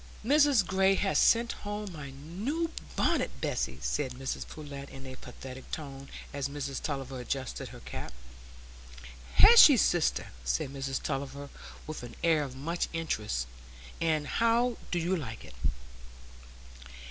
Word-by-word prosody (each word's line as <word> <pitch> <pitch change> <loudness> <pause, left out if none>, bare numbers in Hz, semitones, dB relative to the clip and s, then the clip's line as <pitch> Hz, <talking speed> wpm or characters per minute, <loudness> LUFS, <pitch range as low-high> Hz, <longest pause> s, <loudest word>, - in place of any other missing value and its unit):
"Mrs 285 -5 +5
Gray 190 +1 +3
has 195 0 +2
sent 230 0 +5
home 205 -1 -5
my 145 -3 -7
new 200 - -3 0.2
bonnet, - - +2
Bessy," - - -1
said 130 -4 -1
Mrs 135 +1 -4
Pullet, 140 -2 -8
in 135 0 -10
a 130 - -7
pathetic 130 0 -10
tone, 140 -2 -6 0.2
as 140 -1 -2
Mrs 140 -1 -4
Tulliver 135 -3 -3
adjusted 130 +1 -3
her - - -11
cap. 65 +1 -6 1.2
"Has 470 +1 +10
she, 285 -4 +9
sister?" 175 -5 +2
said - - 0
Mrs 135 -1 -3
Tulliver, 140 +1 -3 0.4
with 155 - -6
an 120 -1 -9
air 160 -2 +4
of 135 -3 -5
much 165 +6 -2
interest. 105 - -1 0.6
"And 155 -2 +2
how 230 +7 +2
do 180 - 0
you 175 +2 +1
like 125 -10 -6
it?" - - -12
145 Hz, 140 wpm, -30 LUFS, 135-190 Hz, 1.2 s, Has